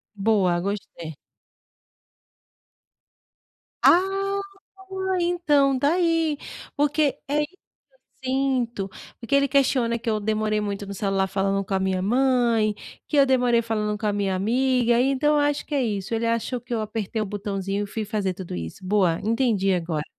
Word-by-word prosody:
Boa. 195 -4 +2
Gostei. 175 -4 -5 2.7
Ah, 390 +2 +3 0.5
boa, 380 -1 -2
então, 295 -6 +2
tá 285 +5 +2
aí. 330 -4 +1 0.4
Porque 290 0 +1
é 290 +2 +1
isso 295 - -3 0.4
que 385 - -15
eu - - -1
sinto. 250 -6 0 0.3
Porque 235 +4 -5
ele 280 0 +4
questiona 255 -4 +2
que 230 0 -4
eu 215 - 0
demorei 215 0 0
muito 205 -1 -3
no 200 - -6
celular 195 -1 0
falando 195 +1 0
com 195 +1 -5
a 190 - +2
minha 190 -1 0
mãe. 235 -1 +2 0.3
Que 300 - -3
eu 280 - +7
demorei 250 -3 +3
falando 215 -2 -2
com 215 - -5
a 210 - +2
minha 200 -2 -1
amiga. 240 +3 +2
Então, 275 +3 +2
eu - - +3
acho 290 0 0
que 300 - -7
é 275 - +2
isso. 205 -2 -2
Ele 225 +1 0
achou 230 +2 -1
que 245 0 -7
eu 220 - 0
apertei 215 0 -3
o - - -1
botãozinho 200 0 -3
e - - -11
fui 220 +2 -4
fazer 205 -3 -2
tudo 180 -1 -8
isso. 80 - -6
Boa. 185 -4 +2
Entendi, 220 -4 +1
agora. 165 -3 -2
230 Hz, 165 wpm, -24 LUFS, 200-275 Hz, 2.7 s, eu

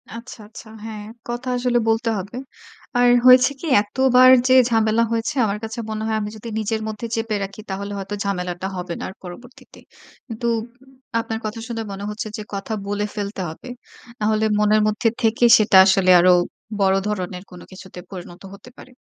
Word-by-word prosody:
আচ্ছা, 230 +2 -10
আচ্ছা। 220 - -13 0.2
হ্যাঁ, 215 -2 -7 0.3
কথা 240 +2 -5
আসলে 245 -1 +1
বলতে 225 +1 +1
হবে। 200 +6 -8 0.6
আর 245 0 +5 0.2
হয়েছে 255 +2 +7
কি - - -8 0.2
এতবার 255 +4 +4 0.2
যে 255 - +4 0.2
ঝামেলা 225 0 +2
হয়েছে 230 +4 -2
আমার 205 0 -2
কাছে 225 +1 -6
মনে 215 0 -4
হয় 220 - 0
আমি 205 - -4
যদি 230 - -10
নিজের 220 +1 -2
মধ্যে 215 +2 -5
চেপে 225 -1 -2
রাখি 195 +2 -8
তাহলে 200 +1 -5
হয়তো 195 +1 -5
ঝামেলাটা 180 -1 -3
হবে 180 -1 -5
না - - -6
আর - - -10
পরবর্তীতে। 240 +8 -13 0.5
কিন্তু 235 -1 -4 0.7
আপনার 225 -1 -4
কথা 220 +2 -4
শুনে 230 -1 -4
মনে 195 +1 -7
হচ্ছে 210 +1 -5
যে - - -6
কথা 200 +3 -4
বলে 205 +1 -1
ফেলতে 200 -1 -4
হবে। 160 +10 -11 0.5
নাহলে 215 +1 +1
মনের 210 0 +3
মধ্যে 215 +2 +1
থেকে 230 +1 +2
সেটা 215 -2 +4
আসলে 190 -1 +3
আরো 180 +1 +5 0.5
বড় 190 0 +3
ধরনের 185 -3 -4
কোন 180 -1 -11
কিছুতে 185 -1 -11
পরিণত 175 -1 -10
হতে 210 +5 -13
পারে। 255 - -14
215 Hz, 175 wpm, -21 LUFS, 195-230 Hz, 0.7 s, হয়েছে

